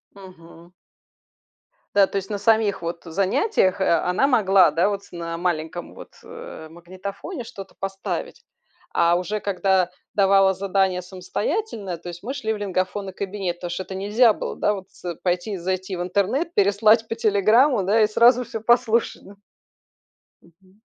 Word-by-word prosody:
Мгм. 175 -3 -15 1.2
Да. 200 -1 +6
То - - -6
есть, 195 -1 -3
на 205 - -2
самих 205 -2 +2
вот 170 0 -5
занятиях, 195 - +1
э, - - +2 0.2
она 180 +10 +1
могла, 195 - +4
да, 170 +5 +2
вот 200 -1 -3
на 170 -1 -5
маленьком 175 -1 -3
вот, - - -12
э, 470 - -10
магнитофоне 190 - -8
что-то 200 -5 -10
поставить. 195 0 -5 0.5
А 170 +1 +3
уже 205 +4 -3
когда 190 -2 +1 0.2
давала 195 -1 +4
задание 190 -1 0
самостоятельное, 195 - -4
то 175 - -11
есть 175 0 -8
мы 245 +6 -4
шли 225 -6 -2
в - - -3
лингафонный 190 0 -2
кабинет, 190 -2 -4
потому 175 0 -6
что 175 - -3
это 190 - -9
нельзя 215 +4 +4
было, - - -5
да, 210 - +1
вот 190 -1 -9
с 175 -2 -7
пойти 180 +3 -1
и - - -3
зайти 185 +1 -3
в 175 - -3
интернет, 210 - -1
переслать 215 +3 +3
по 225 - -3
"Телеграму" 225 +3 +3
да 205 +4 +2
и - - +5
сразу 240 +3 +4
всё 225 - -6
послушать, 235 0 +1
да. 200 - -13 1.1
Мгм. 185 +4 -25
195 Hz, 160 wpm, -23 LUFS, 180-215 Hz, 1.2 s, Да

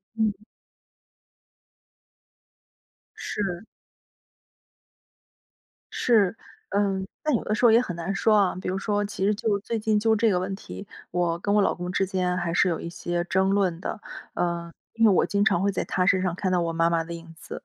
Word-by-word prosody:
嗯。 215 -3 +1 2.8
是。 195 -1 -4 2.3
是， 220 -4 +3 0.3
嗯。 195 -1 0 0.2
但 305 -4 +2
有 - - -1
的 215 - -1
时 220 +3 +2
候 230 - +8
也 235 - +6
很 180 - -4
难 175 +4 -3
说 220 - +3
啊， 195 -3 +2
比 - - -3
如 185 - -1
说 205 +1 0
其 200 -2 -3
实 210 +1 +2
就 210 -2 0
最 230 +3 -3
近 215 -1 +1
就 225 +1 +3
这 225 +1 +3
个 180 - +2
问 190 +1 -3
题， 200 +1 -9 0.2
我 170 -1 0
跟 200 +3 -1
我 210 - +5
老 - - +2
公 180 0 -5
之 195 +1 +1
间 180 -1 -1
还 170 -2 -2
是 180 - +3
有 165 - -1
一 170 - -6
些 175 +1 -3
争 190 +1 +1
论 190 -3 +1
的。 215 - -4 0.3
呃， 170 -1 -2 0.2
因 230 0 +3
为 210 - +7
我 185 - +4
经 200 0 +1
常 180 -4 +2
会 200 - +2
在 195 - -1
他 180 -1 0
身 185 -1 +3
上 180 -2 0
看 185 0 -1
到 180 - +2
我 165 0 -1
妈 165 0 +2
妈 165 -1 +1
的 170 +1 -7
影 165 -1 -10
子。 - - -8
190 Hz, 205 characters per minute, -25 LUFS, 175-210 Hz, 2.8 s, 候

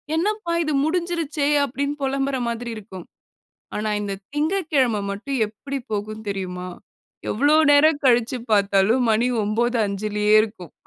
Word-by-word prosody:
"என்னப்பா 405 0 -1
இது 305 -1 -1
முடுஞ்சுருச்சே" 330 -3 -1 0.2
அப்படினு 280 +2 -2
பொலம்புற 270 0 -1
மாதிரி 235 0 -4
இருக்கும். 190 -4 -10 0.7
ஆனா, 215 0 -2
இந்த 200 -1 -3 0.2
திங்ககிழமை 295 - +1
மட்டும், 250 +7 -4
எப்படி 275 +6 -6
போகும் 215 +1 -4
தெரியுமா? 185 -2 -4 0.6
எவ்வளவு 290 +7 +4
நேரம் 290 0 +4
கழிச்சு 245 +1 +3
பாத்தாலும், 200 +4 +3
மணி 230 +3 +2 0.2
9.05யே 210 -2 0
இருக்கும். 205 -7 -7
240 Hz, 115 wpm, -22 LUFS, 210-285 Hz, 0.7 s, எவ்வளவு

